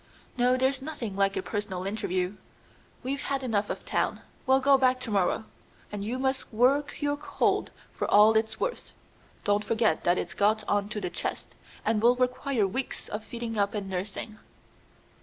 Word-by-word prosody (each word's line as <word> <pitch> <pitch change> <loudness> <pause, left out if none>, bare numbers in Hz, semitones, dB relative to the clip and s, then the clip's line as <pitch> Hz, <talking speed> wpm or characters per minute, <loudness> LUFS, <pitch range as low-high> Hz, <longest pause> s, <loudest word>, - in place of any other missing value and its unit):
"No; 250 +1 +3
there's 260 +1 +1
nothing 265 -9 -5
like 195 0 +2
a 190 - -1
personal 205 -3 -3
interview. 190 -2 -2 0.7
We've 275 +2 -2
had 275 -1 -2
enough 215 -5 0
of - - -5
town. - - 0 0.3
We'll 265 0 +5
go 275 +1 +5
back 255 -1 +3
to 235 - -4
morrow, 200 +2 +1 0.5
and 205 -1 -4
you 235 +5 -2
must 265 0 -1
work 270 +6 +2
your 290 0 +1
cold 290 - 0 0.2
for - - -2
all 210 +2 +7
it's 220 0 +1
worth. - - -3 0.5
Don't 205 0 +2
forget 220 -7 +1
that 175 +1 +3
it's 170 - -3
got 215 +1 +2
on 205 0 +1
to 215 -1 -4
the 180 -2 -3
chest, - - -4 0.3
and 220 -1 +2
will 240 +2 +5
require 250 -2 +1
weeks 255 +8 -3
of 210 +1 -4
feeding 230 -1 -4
up 200 +1 +1
and 195 -2 -4
nursing." 200 +3 -4
220 Hz, 175 wpm, -28 LUFS, 205-260 Hz, 0.7 s, all